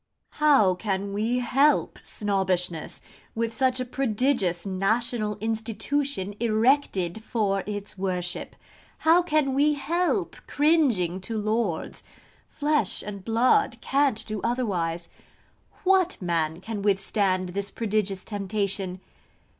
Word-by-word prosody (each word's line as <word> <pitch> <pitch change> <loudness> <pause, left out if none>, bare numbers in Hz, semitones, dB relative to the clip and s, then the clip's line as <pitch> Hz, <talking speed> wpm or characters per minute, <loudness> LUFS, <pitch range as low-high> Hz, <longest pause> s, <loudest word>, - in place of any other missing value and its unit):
How 280 -11 +5
can 200 +1 -3
we 220 +4 0
help 270 +4 +2
Snobbishness, 185 -5 -1 0.3
with 230 0 -1
such 255 +1 +1
a 255 - -1
prodigious 240 -8 0
national 210 +2 0
institution 225 +1 -2
erected 220 -4 +1
for 205 -4 0
its 205 -2 -5
worship? 180 -1 -3 0.5
How 330 +2 +6
can 305 -5 +1
we 295 +2 +3
help 340 +5 -1
cringing 260 - +2
to 225 +4 -4
Lords? 215 -5 -1 0.4
Flesh 295 -8 0
and 200 -2 -7
blood 245 - +2
can't 270 -5 +1
do 215 -3 -4
otherwise. 180 -9 -1 0.8
What 375 -1 +3
man 165 -2 -1
can 220 0 -5
withstand 195 -2 +1
this 200 +2 -3
prodigious 205 -4 -2
temptation? 195 -2 -3
215 Hz, 105 wpm, -26 LUFS, 190-255 Hz, 0.8 s, How